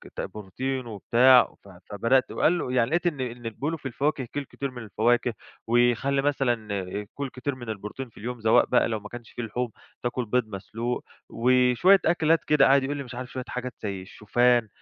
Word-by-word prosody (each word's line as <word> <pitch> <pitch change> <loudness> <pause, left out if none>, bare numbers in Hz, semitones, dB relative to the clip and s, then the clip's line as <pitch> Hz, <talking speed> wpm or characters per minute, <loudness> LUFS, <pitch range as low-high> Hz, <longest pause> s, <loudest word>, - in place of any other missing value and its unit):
ت - - -3
بروتين 125 +6 -4
وبتاع، 120 +4 +5
ف 100 - -15 0.2
فبدأت 115 +6 +2
وقال 175 +3 +2
له 130 - -3
يعني 115 -2 +2
لقيت 175 +2 +1
إن 155 -5 -1
إن 120 -1 -5
بيقولوا 150 +8 -3
في 145 - -24
الفواكه 135 +2 -1
كُل 145 - -2
كتير 140 +1 -5
من 125 -2 -8
الفواكه، 115 +3 +1 0.3
وخلِّ 120 +3 +2
مثلًا 120 -8 0 0.3
كُل 140 -2 -4
كتير 130 +2 -4
من 120 -3 -9
البروتين 110 +5 -6
في - - -24
اليوم، 120 +2 -6
سواء 110 0 +5
بقى - - +3
لو 110 -2 -2
ما 105 - -10
كانش 120 -1 -10
فيه 120 - -5
لحوم 120 +2 -3 0.3
تاكل 120 0 -1
بيض 120 +1 0
مسلوق، 115 +5 -4 0.3
وشوية 125 +10 +4
أكلات 165 -1 +3
كده 150 -2 +5
قعد 135 0 +5
يقول 145 +2 -2
لي 140 - -4
مش 125 -2 -10
عارف 125 0 -6
شوية 130 -1 -4
حاجات 125 0 -5
زي 100 -3 -3
الشوفان، 120 +4 +2
125 Hz, 195 wpm, -26 LUFS, 115-135 Hz, 0.3 s, وبتاع